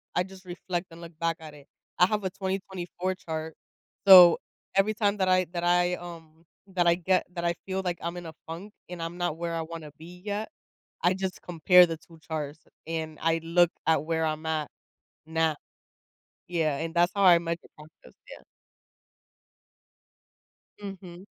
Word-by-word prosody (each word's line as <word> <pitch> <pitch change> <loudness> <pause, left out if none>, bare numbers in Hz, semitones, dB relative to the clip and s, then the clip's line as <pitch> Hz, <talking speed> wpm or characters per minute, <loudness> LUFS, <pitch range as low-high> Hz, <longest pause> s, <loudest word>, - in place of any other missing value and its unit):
I 180 - +3
just 190 0 -13
reflect 180 0 -4
and 165 +1 -12
look 165 -2 -11
back 165 -1 0
at 155 -2 -10
it. 145 -1 -16 0.3
I 180 - +8
have 210 -1 -1
a 190 - 0
2024 190 -1 -3
chart, 160 -3 -5 0.5
so 180 -3 +10 0.4
every 195 +3 +3
time 210 -1 +1
that 190 - +1
I 185 0 +4
that 175 - -3
I, 175 0 +3
um 165 -2 -11 0.3
that 175 -2 +2
I 170 - +5
get 185 +1 +1
that 170 0 -3
I 170 - +2
feel 190 0 -2
like 175 -1 -2
I'm 170 +1 -4
in 175 - -7
a 160 - -8
funk 175 +6 -8 0.2
and 180 -2 -7
I'm 170 +2 -5
not 175 -3 -1
where 170 0 -3
I 165 - -1
wanna 160 -2 -8
be 175 +2 -12
yet, 210 +4 -3 0.5
I 180 +1 +3
just 190 -1 -4
compare 180 +1 +6
the 165 -1 -4
2 165 +1 -18
charts 155 -1 -5 0.3
and 160 -1 -4
I 165 0 +2
look 170 +1 +3 0.2
at 160 -2 +3
where 160 0 0
I'm 155 0 -3
at 155 -2 -1 0.6
now. 160 -1 +1 0.9
Yeah, 160 -5 0
and 165 +2 -4
that's 175 +1 +3
how 200 - +1
I 180 -3 +8
measure 170 0 -5
progress, 155 +1 -17 0.2
yeah. - - -11 2.4
Mhm. 190 -2 -9
170 Hz, 175 wpm, -27 LUFS, 160-185 Hz, 2.4 s, so